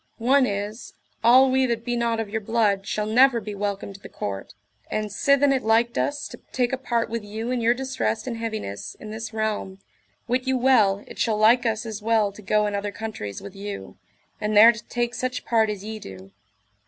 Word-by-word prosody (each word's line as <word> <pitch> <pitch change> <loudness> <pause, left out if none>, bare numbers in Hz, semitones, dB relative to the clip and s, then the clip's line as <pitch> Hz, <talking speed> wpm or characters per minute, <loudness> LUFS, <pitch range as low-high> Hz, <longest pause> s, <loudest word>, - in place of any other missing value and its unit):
One 255 +3 +3
is, 205 +3 -5 0.3
all 255 +3 +6
we 260 0 +3
that 230 -1 -2
be 240 -1 -1
not 235 -1 0
of 225 - -2
your 220 +2 -3
blood 205 -3 +1
shall 210 0 -1
never 245 +3 +5
be 210 -1 -7
welcome 200 -1 -3
to 195 - -12
the - - -11
court. 100 0 -6 0.3
And 215 -1 -2
sithen 280 +5 +3
it 265 - 0
liked 230 +2 +2
us 290 0 -1
to - - -11
take 250 0 0
a - - +1
part 235 -3 -1
with 230 -1 -4
you 220 +4 -5
in 250 -2 -1
your 235 +1 +3
distress 255 - -2
and 240 -3 -4
heaviness 105 - -5
in 215 - -8
this 220 0 -6
realm, 215 -3 -2 0.5
wit 250 +2 -1
you 265 0 +2
well 215 -6 +3
it - - -12
shall 220 -3 +1
like 235 +3 +4
us 220 0 -1
as 220 -2 -6
well 215 -2 +2
to 205 - -13
go 210 +1 +2
in 205 - -2
other 200 0 -2
countries 210 - -6
with 200 -1 -9
you, 200 0 -7 0.5
and 210 0 0
there 225 +3 +10
to 220 -2 -9
take 240 0 -2
such 255 0 -3
part 225 -2 +2
as 205 -2 -4
ye 220 +1 -6
do. 95 - -11
220 Hz, 215 wpm, -24 LUFS, 205-240 Hz, 0.5 s, there